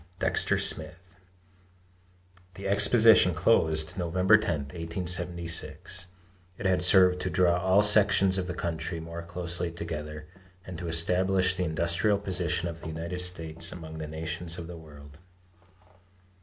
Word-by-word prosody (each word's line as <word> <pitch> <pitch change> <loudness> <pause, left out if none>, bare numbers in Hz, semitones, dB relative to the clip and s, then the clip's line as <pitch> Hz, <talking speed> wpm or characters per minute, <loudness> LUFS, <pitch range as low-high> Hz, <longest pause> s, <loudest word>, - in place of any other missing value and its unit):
DEXTER - - +1
SMITH. 90 +1 -3 1.4
The 100 0 -6
exposition 100 -2 +5
closed 80 0 +1
November 90 +4 +3
10, 85 -8 0
1876. 85 +3 -4 0.5
It - - -8
had 95 -1 +2
served 90 0 +5
to 90 - -2
draw 90 0 +2
all 95 +3 +3
sections 100 -2 +3
of 90 - -4
the 90 - -5
country 85 0 -4
more 85 +1 -7
closely 85 0 -2
together, 75 -2 -7 0.4
and 90 - -8
to 90 - -6
establish 90 +3 +2
the 90 0 -2
industrial 85 +5 +1
position 90 -3 -1
of 85 -1 -8
the 85 - -8
United 85 +3 -5
States 80 -2 -2
among 80 -2 -9
the 80 - -5
nations 80 +2 -5
of 85 - -7
the 85 +1 -9
world. 75 -2 -14
85 Hz, 135 wpm, -27 LUFS, 80-95 Hz, 1.4 s, exposition